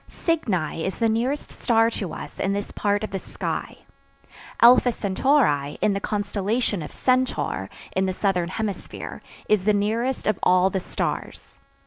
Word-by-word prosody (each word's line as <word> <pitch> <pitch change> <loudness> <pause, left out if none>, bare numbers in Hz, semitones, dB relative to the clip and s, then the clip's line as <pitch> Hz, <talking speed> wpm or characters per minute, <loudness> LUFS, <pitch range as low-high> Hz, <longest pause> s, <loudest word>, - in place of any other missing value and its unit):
Cygni 190 - -1
is 190 - -3
the 230 - +2
nearest 240 +6 -1
star 225 -1 +2
to 195 -6 -4
us - - -8
in 195 - 0
this 205 0 -3
part 205 0 0
of 215 - -4
the 195 - -2
sky. - - -4 0.8
Alpha 245 +1 +7
Centauri, 200 - +1
in 210 - +2
the 195 - -1
constellation 205 +1 -1
of 150 - -7
Centaur, 250 - 0 0.3
in 190 0 +2
the - - 0
Southern 180 -2 0
Hemisphere, 205 -1 -5 0.3
is 210 -3 +2
the 210 - +4
nearest 225 +6 0
of 215 - +1
all 185 +1 +4
the 190 - 0
stars. - - -4
205 Hz, 155 wpm, -24 LUFS, 190-230 Hz, 0.8 s, Alpha